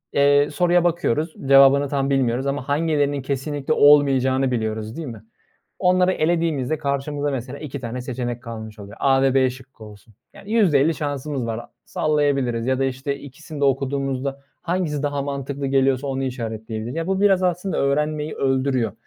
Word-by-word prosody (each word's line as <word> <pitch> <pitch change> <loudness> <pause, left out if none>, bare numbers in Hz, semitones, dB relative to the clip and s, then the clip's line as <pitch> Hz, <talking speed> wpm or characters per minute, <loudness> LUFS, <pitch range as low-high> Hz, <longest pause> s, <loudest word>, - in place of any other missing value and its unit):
ııı, 145 +1 +4
soruya 175 +2 +2
bakıyoruz 160 -2 0
cevabını 140 +1 +6
tam 140 -1 0
bilmiyoruz 130 -1 +1
ama 140 -1 -3
hangilerinin 145 -2 +1
kesinlikle 140 +2 -2
olmayacağını 135 -3 +4
biliyoruz 110 -1 -3
değil 165 -3 -5
mi? 110 -4 -9 0.6
Onları 180 0 +3
elediğimizde 155 -4 0
karşımıza 145 0 -2
mesela 130 +1 -5
2 145 -2 -7
tane 120 +1 -5
seçenek 120 -1 -4
kalmış 110 -2 -8
oluyor: 100 0 -10
A 135 -1 +3
ve 135 -1 +2
b 130 -1 +3
şıkkı 130 -3 -13
olsun, 105 +1 -15 0.2
yani, 200 - -13
%50 165 -8 +3
şansımız 145 -3 -3
var. 115 +1 -4 0.2
Sallayabiliriz 140 -6 0
ya 130 0 +1
da, 135 - +1
işte, 135 +2 -2
2'sini 145 +2 -10
de - - +2
okuduğumuzda, 135 0 -1 0.2
hangisi 170 -5 -1
daha 145 -1 -1
mantıklı 140 0 -4
geliyorsa 135 0 +1
onu 135 0 -2
işaretleyebiliriz. 115 -1 -5
Ya, 165 +1 -2
bu 190 0 0
biraz 195 -2 +4
aslında 180 +1 -1
öğrenmeyi 150 +2 0
öldürüyor. 130 -4 0
140 Hz, 155 wpm, -22 LUFS, 130-150 Hz, 0.6 s, cevabını